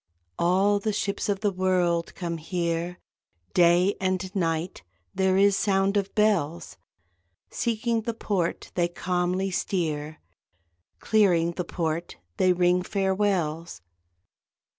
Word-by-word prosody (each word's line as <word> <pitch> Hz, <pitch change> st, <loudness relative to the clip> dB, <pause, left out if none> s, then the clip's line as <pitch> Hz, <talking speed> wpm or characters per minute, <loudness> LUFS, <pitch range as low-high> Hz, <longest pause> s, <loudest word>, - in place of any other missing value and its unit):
All 195 Hz, +4 st, +3 dB
the 215 Hz, +1 st, -2 dB
ships 200 Hz, 0 st, -2 dB
of 200 Hz, -1 st, -1 dB
the 205 Hz, -2 st, +1 dB
world 180 Hz, -2 st, 0 dB
come 170 Hz, -2 st, -4 dB
here, 170 Hz, +1 st, -2 dB, 0.6 s
Day 175 Hz, +3 st, +4 dB
and 185 Hz, 0 st, -1 dB
night 165 Hz, -1 st, -1 dB, 0.3 s
there 190 Hz, 0 st, +2 dB
is 200 Hz, 0 st, +4 dB
sound 195 Hz, 0 st, +1 dB
of 200 Hz, -1 st, -1 dB
bells, 175 Hz, -, +1 dB, 0.8 s
Seeking 230 Hz, 0 st, -1 dB
the 225 Hz, +1 st, -4 dB
port 190 Hz, -6 st, -2 dB
they 175 Hz, -1 st, +1 dB
calmly 180 Hz, +2 st, -1 dB
steer, 155 Hz, -5 st, -2 dB, 0.8 s
Clearing 180 Hz, -6 st, +3 dB
the 175 Hz, +1 st, -4 dB
port 165 Hz, 0 st, -3 dB, 0.2 s
they 185 Hz, -, +4 dB
ring 180 Hz, 0 st, +3 dB
farewells. 185 Hz, -, -1 dB
185 Hz, 115 wpm, -26 LUFS, 170-200 Hz, 0.8 s, Day